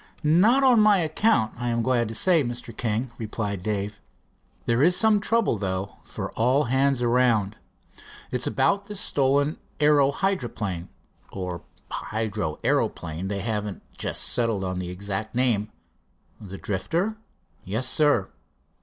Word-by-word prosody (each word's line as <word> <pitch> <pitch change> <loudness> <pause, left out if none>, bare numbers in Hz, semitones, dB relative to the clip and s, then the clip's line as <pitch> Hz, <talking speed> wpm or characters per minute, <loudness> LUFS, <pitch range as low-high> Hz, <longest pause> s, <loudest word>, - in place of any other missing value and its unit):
"Not 200 - +4
on 250 -4 +6
my 210 -1 +6
account, 160 - +2
I, 120 0 -1
am 115 0 0
glad 120 -2 +1
to 110 - -5
say, 170 +4 +4
Mr. 120 -2 -6
King," 115 +2 -2
replied 105 -3 -3
Dave. 100 0 -3 0.6
"There 115 +2 +2
is 180 +4 +5
some 220 -2 +4
trouble, 215 - +1
though, 95 0 -3
for - - -6
all 125 +6 +2
hands 130 0 +1
around. 115 -4 +2 0.8
It's - - 0
about 200 0 +1
the 210 - -6
stolen 145 -4 +1 0.2
aero 145 -2 +5
hydroplane, 120 - -2 0.4
or 90 -3 -5 0.3
hydro 105 -7 -3
aeroplane, 80 +4 -1
they 100 0 -3
haven't 105 -2 -3
just - - -1
settled 115 -5 +1
on 90 -1 -3
the 90 -1 -4
exact 100 +4 -4
name." 115 -4 +1 0.7
"The 95 -2 -9
Drifter?" 175 - -2 0.5
"Yes, 110 +7 -2
sir." 145 -9 +2
120 Hz, 135 wpm, -25 LUFS, 100-150 Hz, 0.8 s, on